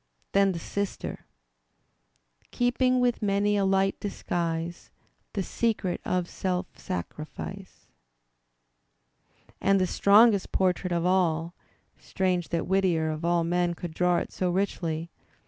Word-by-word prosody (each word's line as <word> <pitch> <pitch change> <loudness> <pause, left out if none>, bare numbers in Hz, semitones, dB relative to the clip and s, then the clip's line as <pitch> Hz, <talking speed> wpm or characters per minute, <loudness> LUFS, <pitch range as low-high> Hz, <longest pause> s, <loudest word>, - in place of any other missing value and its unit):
Then 195 -1 +4
the - - -4
sister 200 +4 -4 1.2
Keeping 255 +1 +2
with 245 -1 +1
many 205 0 +2
a 200 -1 +2
light 195 0 +2
disguise 170 -4 -3 0.4
The 195 - -1
secret 210 -4 -1
of 180 -1 -1
self 180 0 -2
sacrifice. 155 - -7 1.8
And 195 0 +4
the 185 - +3
strongest 200 +2 +4
portrait 180 -1 +1
of 170 0 0
all 170 -3 +1 0.5
(strange 185 -3 -1
that 170 -1 -1
Whittier 180 -4 +1
of 155 +1 -5
all 170 0 +2
men 175 +1 0
could 170 -1 -6
draw 180 +1 +2
it - - -3
so 185 - -1
richly!) 170 -3 -2
185 Hz, 120 wpm, -27 LUFS, 170-200 Hz, 1.8 s, Then